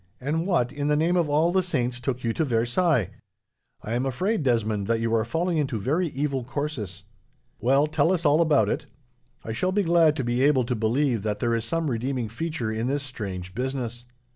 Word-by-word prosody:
"And 155 +6 -1
what, 165 -11 +1
in 145 0 -3
the 150 - +3
name 165 +4 +2
of 170 -4 +2
all 155 +4 +3
the 190 +1 +3
saints, 125 -9 -1
took 125 0 -3
you 115 -1 0
to 160 - 0
Versailles! 120 - +1 0.7
I 110 - -4
am 125 +3 0
afraid, 190 - 0
Desmond, 110 -6 0
that 115 -1 +1
you 115 0 -1
are 115 -1 +3
falling 165 +9 -1
into 135 -6 -1
very 155 - 0
evil 140 -2 -2
courses. 125 - -4 0.6
"Well, 135 +5 +3
tell 155 +2 +2
us 175 -3 0
all 150 +3 +5
about 155 -4 +3
it. - - -2 0.6
I 110 - -3
shall 185 +11 0
be 205 +1 +1
glad 165 -3 +4
to 135 - -2
be 120 +1 0
able 140 -2 +4
to 120 +1 -2
believe 120 +2 +1
that 105 0 -2
there 120 -2 +1
is 115 -1 -1
some 165 +6 -1
redeeming 125 -1 -2
feature 130 -2 -3
in 110 +2 -2
this 140 +1 -1
strange 95 -9 -6
business." 120 0 -4
130 Hz, 210 wpm, -25 LUFS, 115-155 Hz, 0.7 s, all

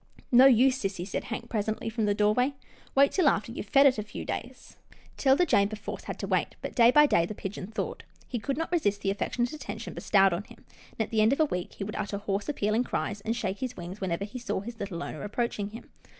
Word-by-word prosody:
" - - -25
No 255 +2 +8
use, 260 +1 +5
sissy," 195 -4 -3
said - - -3
Hank 235 - -5
presently 220 -1 -2
from 225 -1 -1
the 205 -1 +1
doorway, 230 +7 +2 0.2
" - - -27
wait 275 +1 +5
till 355 -6 +4
after 215 -1 -1
you've 215 - -6
fed 275 +5 +5
it 255 -5 +5
a - - -2
few 210 - -7
days." 255 +2 -6 0.4
'Tilda 275 +6 +4
Jane 200 -10 +3
perforce 210 -1 -7
had - - -5
to - - -4
wait, - - 0
but - - -6
day 235 -2 +6
by 295 +4 +7
day 170 -12 +3
the 215 - -6
pigeon 195 -1 -6
thawed. 220 +2 -4 0.2
He 245 - -3
could 275 +4 -2
not 325 +1 -3
resist 205 - +1
the 195 - +1
affec 200 - -3
tionate 240 +2 0
attention 310 - -6
bestowed 195 -3 +3
on 185 +5 -3
him, - - -17 0.3
and, - - -4
at 220 - -2
the 220 -1 +2
end 220 +4 +5
of 280 - -2
a 315 - +5
week, 180 -11 -4
he - - -6
would 210 +2 -5
utter 205 -1 -3
hoarse, 200 +4 -3
appealing 220 -4 +1
cries, 210 -4 -3
and 225 +3 -2
shake 200 -4 -3
his 255 -1 -4
wings 180 +4 -7
whenever 190 +1 -1
he 235 +5 -7
saw 235 -5 -2
his 230 +2 -8
little 185 -4 -4
owner 155 - -6
approaching 210 -1 -2
him. 230 +3 -11
215 Hz, 255 wpm, -28 LUFS, 200-255 Hz, 0.4 s, No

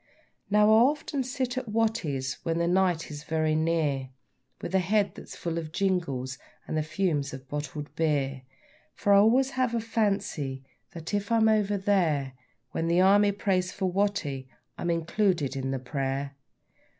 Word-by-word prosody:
Now, 210 +1 +5
I - - +7
often 280 +3 +2
sit 255 0 -2
at 250 - -9
Watty's 210 -12 -1
when 165 -1 -1
the 170 0 +1
night 180 -3 +1
is 150 0 -7
very 155 0 0
near, 155 -4 0 0.5
With - - -6
a 190 - +4
head 200 +2 +1
that's - - -10
full 170 -1 -3
of 155 -2 -7
jingles 165 -10 -1 0.3
and - - -3
the 155 - +2
fumes 155 -4 -1
of 130 0 -12
bottled 150 +1 -5
beer, 140 -4 0 0.5
For 205 - +2
I - - +8
always 255 +6 +4
have 255 -3 0
a - - +1
fancy 195 - -1 0.3
that, 165 +2 -7
if 205 +2 -1
I 230 - +4
am 220 0 +4
over 210 -2 +2
there 170 -9 +1 0.4
When 165 - -2
the 170 +1 +3
Army 200 +2 +5
prays 185 -2 0
for 195 - -3
Watty, 175 -10 -1 0.3
I'm 175 - -3
included 170 -3 0
in 135 0 -2
the 135 - -1
prayer. 135 +1 -3
170 Hz, 170 wpm, -28 LUFS, 145-205 Hz, 0.5 s, I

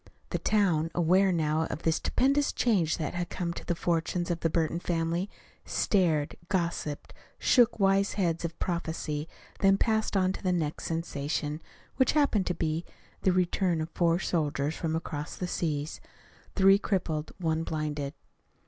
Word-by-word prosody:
The - - -1
town, 175 -7 +2
aware 185 +3 +4
now 160 -2 +1
of 155 - -6
the 165 - +3
stupendous 275 - +2
change 190 -10 +1
that 155 -3 -3
had 175 0 -3
come 170 -2 -3
to - - -7
the 175 - -1
fortunes 170 +1 -1
of 170 - -1
the 165 - +1
Burton 165 +1 0
family, 170 +2 -1 0.3
stared, 165 -7 +1
gossiped, 170 -5 -2 0.2
shook 240 -3 +4
wise 195 0 +3
heads 170 -4 0
of 165 0 -4
prophecy, 160 -3 -3 0.3
then 195 0 +5
passed 220 -1 +1
on 185 0 +2
to - - -7
the 185 - +1
next 160 -4 -2
sensation 150 -2 -2 0.4
which 260 - +3
happened 280 -10 +2
to 180 - 0
be 160 0 -1 0.4
the 190 - +3
return 180 -1 +1
of 155 +1 -4
four 170 -1 +2
soldiers 150 -4 -1
from 160 -2 -2
across 150 -2 -4
the 180 - -3
seas; 155 -4 -2 0.5
three 195 0 +6
crippled, 165 -7 -1
one 160 -3 0
blinded. 150 -3 -3
170 Hz, 155 wpm, -29 LUFS, 160-190 Hz, 0.5 s, three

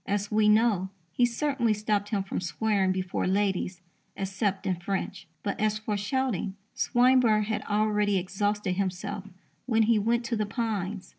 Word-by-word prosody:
As 205 +1 -1
we 210 0 +4
know, 210 -4 +3 0.2
he 245 +7 +3
certainly 240 -3 0
stopped 210 -1 -1
him 205 -3 0
from 195 - -4
swearing 190 +4 +1
before 185 -1 -1
ladies, 190 -2 0 0.4
except 195 0 -2
in 185 -2 0
French. 190 0 -4 0.2
But, 200 - -2
as 215 0 +1
for 215 0 -3
shouting, 210 -2 -1 0.2
Swinburne 245 -3 +4
had 215 0 -2
already 210 -1 +2
exhausted 195 +1 -1
himself 195 +1 -3 0.4
when 225 -2 +3
he 220 0 +3
went 235 +3 +1
to 235 0 -1
the 215 -1 -1
Pines. 205 -4 -3
205 Hz, 155 wpm, -28 LUFS, 195-220 Hz, 0.4 s, we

